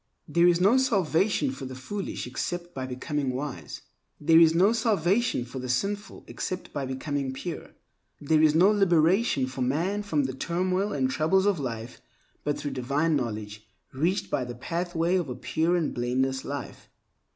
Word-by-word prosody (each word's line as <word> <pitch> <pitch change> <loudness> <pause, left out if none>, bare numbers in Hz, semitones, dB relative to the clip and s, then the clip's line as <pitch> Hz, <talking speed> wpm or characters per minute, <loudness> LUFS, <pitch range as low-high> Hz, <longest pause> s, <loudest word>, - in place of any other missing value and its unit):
There 170 +3 +4
is 175 -1 +4
no 200 +8 +5
salvation 205 - +1
for 135 - -7
the 130 0 -7
foolish 190 +11 -5
except 175 +7 -4
by 130 -1 -4
becoming 130 +1 -2
wise. 130 - -6 0.4
There 160 +2 +5
is 165 -1 +6
no 195 +6 +5
salvation 220 - +1
for 125 +2 -7
the 125 0 -5
sinful 200 - -2
except 185 0 -5
by 140 -3 -3
becoming 135 0 -3
pure. 165 +5 -7 0.4
There 155 +1 +2
is 155 -1 +4
no 185 +5 +6
liberation 180 - +3
for 130 0 -6
man 165 +11 0
from 160 -8 0
the 130 -1 -2
turmoil 185 +7 -1
and 130 -2 +1
troubles 160 +9 +2
of 200 -5 +2
life 115 -3 -5 0.4
but 145 -1 -1
through 145 - -4
divine 140 +5 0
knowledge 110 -4 -4 0.3
reached 170 +9 -1
by 130 - 0
the 120 -1 -6
pathway 170 +5 -1
of 170 -6 -2
a 125 - -4
pure 160 +6 0
and 170 -4 0
blameless 130 +2 -1
life. 140 -2 -7
155 Hz, 170 wpm, -27 LUFS, 130-185 Hz, 0.4 s, is